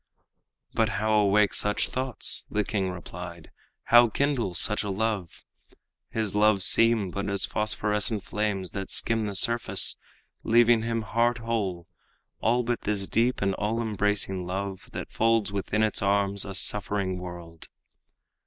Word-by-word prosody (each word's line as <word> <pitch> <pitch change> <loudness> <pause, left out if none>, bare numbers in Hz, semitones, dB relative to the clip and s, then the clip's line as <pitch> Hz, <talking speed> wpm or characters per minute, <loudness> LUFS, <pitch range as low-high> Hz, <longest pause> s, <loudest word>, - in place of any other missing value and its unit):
"But 110 -1 +1
how 110 +1 0
awake 105 -1 +3
such 105 0 0
thoughts?" 130 -2 +1
The 105 - 0
king 100 -2 -2
replied. 85 -2 -9 0.3
"How 120 0 +6
kindle 125 -8 -1
such 105 +5 +1
a 105 - -4
love? 100 -3 -3 0.7
His 110 -3 -2
loves 105 -2 +4
seem 115 -5 +3
but 100 +2 -4
as 100 -2 +1
phosphorescent 105 0 +1
flames 100 -3 -3
That 95 -1 -6
skim 115 -1 +1
the 105 -2 -3
surface, 115 +4 +2 0.5
leaving 120 0 +4
him 115 0 -2
heart 120 +2 0
whole 105 -7 -3 0.5
All 120 +3 +1
but 120 0 -2
this 100 -2 -2
deep 120 -1 0
and 100 -1 +1
all 110 +4 -2
embracing 105 -4 -1
love 95 +1 -5
That - - -7
folds 115 -2 +1
within 100 +2 -1
its 110 - 0
arms 100 0 +2
a 100 -1 -6
suffering 100 -1 -1
world." 85 -2 -10
105 Hz, 145 wpm, -26 LUFS, 95-115 Hz, 0.7 s, How